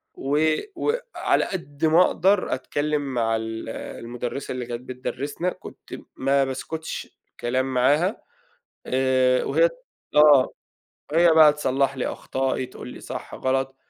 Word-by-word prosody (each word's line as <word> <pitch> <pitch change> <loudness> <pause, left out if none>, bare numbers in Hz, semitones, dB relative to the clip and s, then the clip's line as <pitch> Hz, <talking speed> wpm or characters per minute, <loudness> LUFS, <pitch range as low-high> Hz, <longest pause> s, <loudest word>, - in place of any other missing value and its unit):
و 150 +3 +1 0.2
وعلى 480 +7 0
قد 160 -6 -4
ما 160 +3 +5
أقدر 190 +2 +2
أتكلّم 150 0 -1
مع 115 -2 +1
ال 110 0 -4
المُدرِّسة 120 +4 -6
اللي 125 -1 -4
كانت 120 0 -5
بتدرّسنا. 130 +6 -4
كنت - - -11 0.2
ما 135 +1 +2
باسكُتش 160 +5 -6 0.2
كلام 130 +2 -1
معاها، 145 - +2 0.7
آآ، 130 -1 +2
وهي - - +3
ت - - -15 0.4
آه، 150 -3 +7 0.7
هي 170 0 +5
بقى 155 -2 +7
تصلح 135 -2 0
لي 130 - -1
أخطائي، 130 -1 -2
تقول 125 - -10
لي - - -10
صح، - - -7
غلط. 135 0 -1
135 Hz, 130 wpm, -24 LUFS, 130-155 Hz, 0.7 s, آه